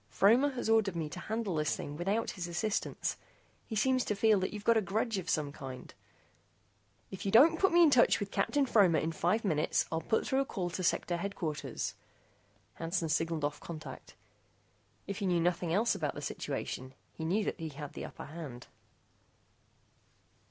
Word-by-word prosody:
Fromer 240 +8 +4
has 245 - -3
ordered 220 -4 +3
me 160 -2 -2
to - - -7
handle 220 -3 -2
this 155 -1 0
thing 145 - -6
without 195 +8 -1
his 180 -3 -5
assistance. 200 +5 -2 0.5
He 220 - -4
seems 255 +4 +2
to 210 - -1
feel 215 0 +4
that 190 - -2
you 210 - -5
have 230 - +5
a 220 - +4
grudge 215 +2 -1
of 180 -1 -6
some 150 -2 0
kind 130 -2 -9 0.6
" - - -39
"If 190 - -7
you 195 - -1
don't 320 +9 +7
put 385 - +4
me 345 0 +6
in 310 - +6
touch 245 -3 +5
with 205 -1 -4
Captain 290 -1 +1
Fromer 195 -10 +4
in 160 +2 0
five 180 +7 0
minutes, 155 -5 +1
I'll 160 0 -1
put 220 - 0
through 265 - +1
a 275 - +1
call 180 -8 -3
to 185 - -4
Sector 175 0 +1
Headquarters." 170 -5 -3 0.8
Hansen 165 0 -2
signaled 165 -1 0
off 150 0 -3
contact. 160 -2 -9 0.9
If 200 +1 -5
he 200 - -1
knew 175 -2 +2
nothing 175 0 0
else 215 +7 +3
about - - -2
the - - -6
situation, 130 +1 -4 0.2
he 160 - -7
knew 190 +7 +1
that - - -3
he 160 -1 -4
had 145 0 -8
the - - -6
upper - - -9
hand. 145 -6 -8
185 Hz, 190 wpm, -32 LUFS, 160-220 Hz, 0.9 s, don't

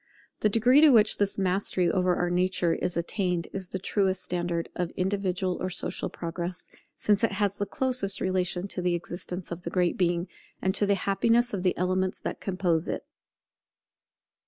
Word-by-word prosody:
The 215 - +3
degree 245 +7 +5
to 310 - +8
which 220 -5 +4
this 200 -1 0
mastery 185 -1 +1
over 180 +1 +2
our 175 - 0
own 175 - -1
nature 180 -1 +2
is 180 - -2
attained 180 0 -1
is 190 -2 -5
the - - -3
truest 190 0 0
standard 175 -1 -2
of 175 -2 -1
individual 185 -1 -1
or 185 - -1
social 180 - -1
progress, 170 +1 -5 0.3
since 205 0 +1
it 230 - +2
has 205 -1 0
the 205 - -2
closest 245 -4 +1
relation 185 0 -1
to 185 - -3
the 175 -1 +1
existence 175 +1 -5
of 170 +1 -5
the 170 - -5
Great 180 0 0
Being, 175 0 +1 0.3
and 190 - 0
to 205 - +1
the 200 - +3
happiness 230 +5 +2
of 195 - -2
the 180 -1 +1
elements 185 +1 0
that - - -5
compose 180 -4 0
it. - - -3
185 Hz, 180 wpm, -27 LUFS, 175-200 Hz, 0.3 s, to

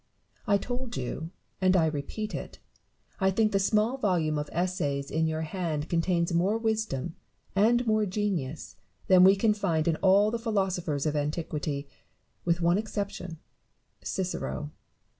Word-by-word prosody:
I 200 - +4
told 245 - -5
you, 135 +5 -4 0.3
and 185 0 +4
I 165 - +4
repeat 160 +8 -3
it, - - -6 0.6
1 190 -1 +2
think 215 +1 +2
the 195 - +2
small 215 +5 +2
volume 165 - +1
of 150 - -4
Essays 155 -6 -1
in 160 +1 +1
your 160 0 -2
hand 160 -3 -3
contains 170 0 +1
more 185 +6 +2
wisdom 220 - -2 0.4
and 235 +5 +4
more 215 -2 +2
genius 180 -8 -3 0.3
than 185 -1 +6
we 190 +1 +8
can 210 +2 +3
find 170 -7 0
in 165 -2 +2
all 200 +2 +4
the 235 - -2
philosophers 190 - -1
of 155 -1 0
antiquity; 150 -1 -2 0.6
with 170 0 +1
one 170 +3 +3
exception, 200 -5 -4 0.7
Cicero. 180 -5 -3
180 Hz, 145 wpm, -28 LUFS, 160-210 Hz, 0.7 s, we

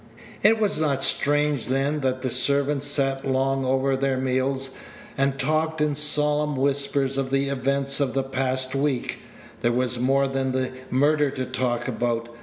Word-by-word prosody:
It 220 +1 +4
was 205 -7 0
not 140 -4 0
strange, 145 -2 +2
then, 135 +3 0
that 130 -1 -2
the 130 - -1
servants 140 +3 +2
sat 135 -1 0
long 135 0 0
over 135 +1 +1
their 135 0 0
meals, 130 +1 -1 0.4
and 135 0 0
talked 155 +3 0
in 150 -1 +1
solemn 150 0 +2
whispers 140 0 0
of 135 -1 -2
the 135 +1 0
events 140 +1 -1
of 135 -2 -1
the 135 - +1
past 130 -1 -2
week. 135 -2 -1 0.4
There 120 - +1
was 125 0 0
more 135 +2 +2
than 135 -1 -2
the 130 0 -1 0.2
murder 145 +2 +2
to 130 -1 -4
talk 125 -2 -2
about. 120 -1 -2
135 Hz, 165 wpm, -24 LUFS, 130-140 Hz, 0.4 s, It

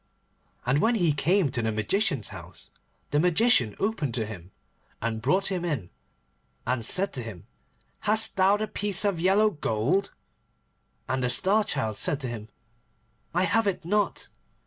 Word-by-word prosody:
And 130 +4 +2
when 230 +6 +3
he 175 -8 +2
came 165 +1 +2
to 120 -2 -2
the 110 0 0
Magician's 135 - 0
house, - - -12 0.4
the 145 - +2
Magician 175 - +3
opened 165 - -1
to 115 -3 -1
him, 95 -5 -9 0.5
and 110 0 -3
brought 185 - +1
him 180 -2 -2
in, 140 - -3 0.7
and 125 -1 -1
said 190 - +2
to 130 - -3
him, 110 -7 -9 0.5
'Hast 215 +1 +2
thou 195 +2 +4
the 215 +1 -2
piece 205 -1 0
of 195 -5 +1
yellow 200 +5 +4
gold?' 145 - 0 1.0
And 130 0 -1
the 125 - +1
Star 195 - +3
Child 110 - -2
said 145 - 0
to 130 - -3
him, 110 -2 -7 0.9
'I 180 - +3
have 225 +3 +2
it 185 -3 -2
not. 205 +3 0
165 Hz, 160 wpm, -27 LUFS, -, 1.0 s, thou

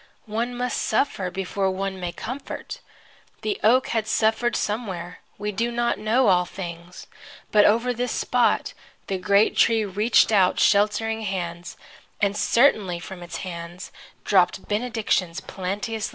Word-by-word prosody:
One 235 +3 -3
must 250 0 -1
suffer 215 -5 0
before 195 +1 -2
one 190 0 -3
may 175 -1 -3
comfort. 255 +10 -7 0.6
The 410 -2 -2
oak 250 +4 +4
had 225 -2 -1
suffered 225 +2 +1
somewhere. 190 -5 -3 0.2
We 210 +1 -3
do 230 +4 -1
not 235 0 0
know 230 +4 +2
all 180 -1 +4
things. 175 -1 -8 0.5
But 210 -1 +6
over 235 +4 +3
this 245 0 -2
spot 250 -1 +1 0.3
the 190 -1 -3
great 200 +3 +3
tree 225 -2 +3
reached 210 +4 +3
out 190 -4 +3
sheltering 215 +2 +2
hands, 175 -4 -4 0.4
and 200 -1 +1
certainly 210 -6 +3
from 180 +2 -9
its 175 - -6
hands 170 0 -7 0.3
dropped 185 -2 +2
benedictions 210 -6 -1
plenteously 200 +4 -4
down. - - -2
205 Hz, 140 wpm, -24 LUFS, 185-230 Hz, 0.6 s, But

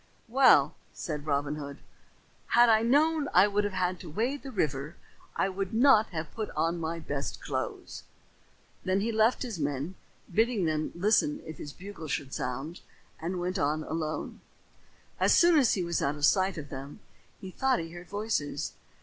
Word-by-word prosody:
"Well," 255 +3 +5 0.2
said 150 -3 -5
Robin 145 +1 0
Hood, 140 -1 -7 0.7
"had 240 0 +5
I 220 -1 +5
known 295 +5 +3
I 185 +3 +7
would 205 0 0
have 185 -2 -1
to 175 - -9
wade 240 - -1
the 275 - -8
river 150 - -2 0.4
I - - +1
would 195 +1 -3
not 230 -3 +6
have 160 -3 -6
put 220 -2 -4
on 170 +1 0
my 165 +1 -3
best 145 -4 -4
clothes." - - -4 0.8
Then 185 +1 +1
he 230 +3 0
left 220 +4 +2
his 230 -9 -5
men, 145 +3 -2 0.4
bidding 225 -2 +2
them 155 -1 -1
listen 220 - +2
if 155 -2 -8
his 145 - -6
bugle 185 -1 -9
should 135 -2 -3
sound, 135 +7 -4 0.4
and 175 +3 -3
went 180 +2 -2
on 150 +2 0
alone. 155 -1 -4 0.8
As - - +4
soon 340 -2 +6
as 255 -5 +3
he 185 - -1
was 170 -1 -1
out 140 +1 0
of 145 -1 +1
sight 190 +2 +3
of 145 -2 -7
them, 140 +8 -8 0.4
he 190 - -8
thought 265 +6 +1
he 165 -1 -5
heard 175 0 -11
voices. 200 -9 -2
180 Hz, 175 wpm, -29 LUFS, 155-220 Hz, 0.8 s, I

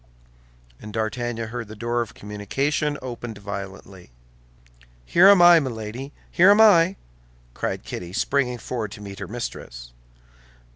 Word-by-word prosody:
And 105 - -9
D'Artagnan 115 +1 -3
heard 120 -1 -6
the 110 - -10
door 120 +2 -1
of 115 - -6
communication 135 +9 -2
opened 120 -3 -7
violently. 100 -2 -8 1.0
"Here 180 +3 +5
am 200 -3 +7
I, 175 -1 +8
Milady, 125 0 -5 0.2
here 185 +3 +5
am 205 +1 +6
I!" 190 -4 +6 0.6
cried - - -3
Kitty, 90 -1 -7
springing 125 +4 0
forward 115 -3 -5
to 105 - -11
meet 100 -1 -9
her - - -6
mistress. - - -7
120 Hz, 135 wpm, -23 LUFS, 105-140 Hz, 1.0 s, I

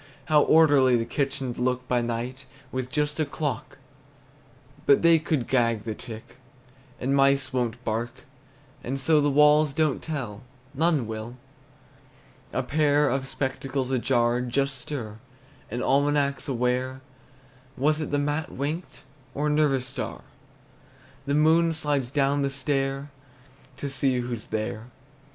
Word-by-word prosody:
How 150 -1 +5
orderly 145 -6 +5
the 115 -1 0
kitchen 135 0 -2
'd - - -11
look 125 0 -1
by 125 -1 +2
night, 120 +3 -4 0.2
With 130 -1 -3
just 150 +2 -1
a - - +3
clock, 140 -5 -4 1.1
But 140 - +5
they 165 -1 +6
could 155 -6 -1
gag 115 -4 +1
the 110 - -3
tick, 110 +1 -9 0.6
And 135 +2 0
mice 135 -1 +3
won't 125 -1 -1
bark; 115 +2 -1 0.7
And 135 +3 -3
so 150 +3 +3
the 145 - +2
walls 150 +1 +5
don't 155 -2 +1
tell, 125 -10 -5 0.3
None 155 -3 +2
will. 110 +2 -6 1.1
A 130 - -1
pair 145 +1 +2
of 135 +1 -1
spectacles 135 -1 -3
ajar 120 -1 +2
just 135 +2 -1
stir 115 -6 -6 0.5
An 120 +3 -3
almanac's 140 +1 +1
aware. 130 0 -1 0.8
Was 150 +4 +2
it 155 - -3
the 145 - 0
mat 145 +2 -1
winked, 150 +6 -5 0.3
Or 145 - -1
a - - +2
nervous 145 -4 +2
star? 130 +1 -5 1.1
The 140 - +1
moon 160 +2 +4
slides 145 -5 -1
down 140 +1 +1
the 140 - +1
stair 135 +1 -2 0.7
To 140 - -4
see 135 -2 0
who's 120 -2 -5
there. 110 +1 -4
135 Hz, 140 wpm, -26 LUFS, 125-145 Hz, 1.1 s, they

